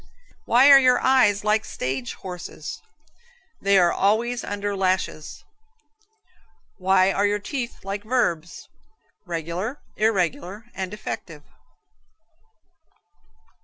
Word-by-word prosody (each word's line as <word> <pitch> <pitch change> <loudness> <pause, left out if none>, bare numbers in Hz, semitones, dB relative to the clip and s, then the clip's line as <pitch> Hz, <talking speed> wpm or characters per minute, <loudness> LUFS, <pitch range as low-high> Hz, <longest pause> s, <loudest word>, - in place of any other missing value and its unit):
Why 260 +4 +6
are 275 - +10
your 255 -2 +4
eyes 235 -7 +3
like 215 0 +2
stage 130 -8 -4
horses? 180 -2 -8 0.8
They 200 0 +4
are 175 -2 +4
always 230 +5 +1
under 205 0 -3
lashes. 185 -5 -2 1.4
Why 190 0 +3
are 200 +1 +1
your 205 0 0
teeth 235 +1 -6
like 200 +1 -4
verbs? 175 -9 -1 0.6
Regular, 175 - -4 0.2
irregular 195 -1 -1
and 190 -1 -4
defective? 170 -6 -7
200 Hz, 95 wpm, -23 LUFS, 180-220 Hz, 1.4 s, are